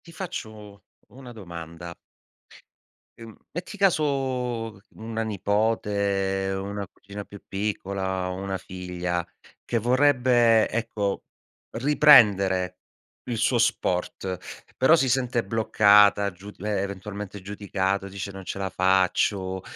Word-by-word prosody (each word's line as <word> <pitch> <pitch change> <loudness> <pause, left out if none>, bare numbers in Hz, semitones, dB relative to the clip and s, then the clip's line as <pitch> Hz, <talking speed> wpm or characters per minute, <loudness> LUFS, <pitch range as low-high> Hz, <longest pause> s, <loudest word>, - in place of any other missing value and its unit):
Ti 170 - -13
faccio 110 - -8 0.3
una 130 -1 -12
domanda. 85 -5 -9 1.2
Uhm, 115 -2 -11 0.2
metti 180 +5 -6
caso 130 - 0 0.2
una 115 0 -4
nipote, 100 -2 0
una 100 +1 -4
cugina 100 +2 -10
più 100 - -12
piccola, 95 -2 -3
una 95 +1 -3
figlia 90 -2 -4 0.4
che 115 - 0
vorrebbe, 125 -2 +4
ecco, 105 -3 -2 0.5
riprendere 105 -9 +5 0.5
il 120 - -3
suo 120 +3 +2
sport, 95 -4 -1 0.4
però 130 +5 +6
si 135 -5 +1
sente 125 -2 +1
bloccata, 105 -1 +4
giu 95 +3 -11
e 105 +3 -4
eventualmente 100 0 -4
giudicato, 100 0 -2
dice: 100 0 -6
"Non 95 -1 -10
ce 90 - -5
la 95 -1 -2
faccio", 95 0 +1
100 Hz, 105 wpm, -25 LUFS, 95-115 Hz, 1.2 s, però